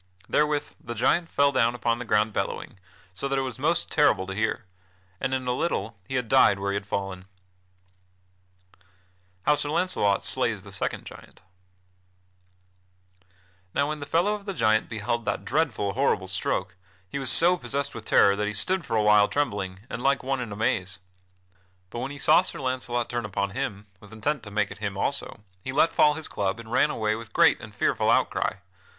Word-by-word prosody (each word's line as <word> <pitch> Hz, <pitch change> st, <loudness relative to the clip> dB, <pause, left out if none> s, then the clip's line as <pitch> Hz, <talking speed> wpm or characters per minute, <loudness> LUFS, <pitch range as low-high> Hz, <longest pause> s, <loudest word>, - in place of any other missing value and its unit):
Therewith 150 Hz, -1 st, 0 dB
the 120 Hz, 0 st, -6 dB
giant 165 Hz, +9 st, +2 dB
fell 140 Hz, 0 st, +3 dB
down 120 Hz, -3 st, +2 dB
upon 120 Hz, -1 st, 0 dB
the 125 Hz, -, -5 dB
ground 105 Hz, 0 st, +2 dB
bellowing, 95 Hz, 0 st, -4 dB, 0.3 s
so 115 Hz, +9 st, -4 dB
that 135 Hz, 0 st, -1 dB
it 135 Hz, -, +1 dB
was 130 Hz, -4 st, -6 dB
most -, -, 0 dB
terrible 95 Hz, -, +3 dB
to 95 Hz, -, -5 dB
hear; 110 Hz, +1 st, -1 dB, 0.5 s
and -, -, -1 dB
in 130 Hz, -1 st, -1 dB
a 125 Hz, -, 0 dB
little 125 Hz, -, -2 dB
he 130 Hz, -, -4 dB
had 125 Hz, -2 st, -1 dB
died 120 Hz, -5 st, +5 dB
where 100 Hz, 0 st, -2 dB
he -, -, -2 dB
had 100 Hz, 0 st, -4 dB
fallen. 95 Hz, -2 st, -4 dB, 1.5 s
[Sidenote: 90 Hz, -, -29 dB, 0.6 s
How 150 Hz, -, +4 dB
Sir 145 Hz, 0 st, +2 dB
Launcelot 155 Hz, -, +1 dB
slays 115 Hz, -7 st, 0 dB
the 100 Hz, -, -12 dB
second 95 Hz, -, -3 dB
giant] -, -, -13 dB, 2.3 s
Now 140 Hz, +1 st, +1 dB
when 155 Hz, 0 st, -3 dB
the 145 Hz, -, -7 dB
fellow 175 Hz, +7 st, +2 dB
of 205 Hz, -1 st, -6 dB
that 195 Hz, -2 st, -4 dB
giant 110 Hz, -5 st, +2 dB
beheld 115 Hz, +1 st, -2 dB
that -, -, -2 dB
dreadful, 130 Hz, -9 st, 0 dB
horrible -, -, +1 dB
stroke, 90 Hz, -, -2 dB, 0.3 s
he 115 Hz, -, -5 dB
was 135 Hz, -3 st, +1 dB
so 175 Hz, +8 st, +6 dB
possessed 140 Hz, -1 st, -3 dB
with 110 Hz, -1 st, -8 dB
terror 100 Hz, -2 st, +5 dB
that 105 Hz, +1 st, -1 dB
he 105 Hz, -, -3 dB
stood 185 Hz, -, +1 dB
for 125 Hz, -5 st, -3 dB
a 105 Hz, -, +2 dB
while 105 Hz, -1 st, +6 dB
trembling 100 Hz, -9 st, -2 dB
and 120 Hz, -, -6 dB
like 140 Hz, +1 st, +2 dB
one 135 Hz, 0 st, -1 dB
in 120 Hz, -4 st, -5 dB
a -, -, -5 dB
maze. 95 Hz, -3 st, -1 dB, 0.9 s
But 120 Hz, -, -5 dB
when 130 Hz, +3 st, -3 dB
he 145 Hz, -, -8 dB
saw -, -, +5 dB
Sir -, -, -5 dB
Launcelot 125 Hz, -3 st, -2 dB
turn 120 Hz, -1 st, -3 dB
upon 100 Hz, 0 st, -2 dB
him 100 Hz, 0 st, -4 dB
with 105 Hz, 0 st, -16 dB
intent 140 Hz, +7 st, -2 dB
to 105 Hz, -, -10 dB
make 105 Hz, +1 st, -1 dB
at -, -, -9 dB
him -, -, -4 dB
also, -, -, -2 dB, 0.2 s
he 130 Hz, -, -4 dB
let 150 Hz, +4 st, +3 dB
fall 150 Hz, 0 st, +4 dB
his 160 Hz, -, -4 dB
club 100 Hz, +2 st, -2 dB
and 115 Hz, -1 st, -10 dB
ran -, -, +3 dB
away 110 Hz, -1 st, 0 dB
with 115 Hz, 0 st, -7 dB
great -, -, +4 dB
and -, -, -10 dB
fearful -, -, 0 dB
outcry. -, -, +2 dB
115 Hz, 200 wpm, -26 LUFS, 105-140 Hz, 2.3 s, so